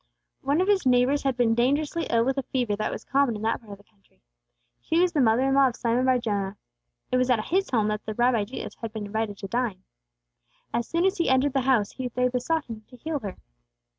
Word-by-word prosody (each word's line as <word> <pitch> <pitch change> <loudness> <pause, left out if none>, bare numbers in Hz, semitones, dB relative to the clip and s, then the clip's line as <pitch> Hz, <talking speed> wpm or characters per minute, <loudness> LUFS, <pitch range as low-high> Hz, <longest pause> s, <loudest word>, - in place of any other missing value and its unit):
One 285 +5 +1
of 370 - +1
his 405 -2 +3
neighbors 255 +3 +3
had 270 -3 -1
been 235 -2 +3
dangerously 285 +7 0
ill 230 0 +2
with 265 +1 0
a - - 0
fever 245 -5 -1
that 215 - -2
was - - -6
common 275 -3 +2
in 210 - -6
that 225 - 0
part 210 -3 -11
of - - -10
the 205 - -21
country; 200 - -35 0.6
she 325 - 0
was 360 0 +3
the 295 - +2
mother 230 +1 +3
in 270 0 +2
law 275 0 +5
of 245 - -3
Simon 240 +1 0
bar 260 -1 +4
Jonah. 205 -4 -2 0.5
It 255 - +3
was 255 0 +1
at 245 -3 +3
his 385 +3 +1
home 220 -5 +1
that 210 0 -3
the 215 - -3
Rabbi 240 -3 +2
Jesus 245 - -7
had 230 -2 -6
been 215 -2 -5
invited 210 0 -3
to 195 - -6
dine. 230 -4 -2 0.9
As 235 - -1
soon 335 +2 0
as 385 +1 +1
He 335 - +2
entered 260 +1 +3
the 270 - +2
house, 245 -6 +2
they 250 -1 -1
besought 275 +6 -1
Him 225 -2 -8
to 250 - -15
heal 300 +4 -3
her. 200 -6 -7
250 Hz, 245 wpm, -26 LUFS, 220-275 Hz, 0.9 s, law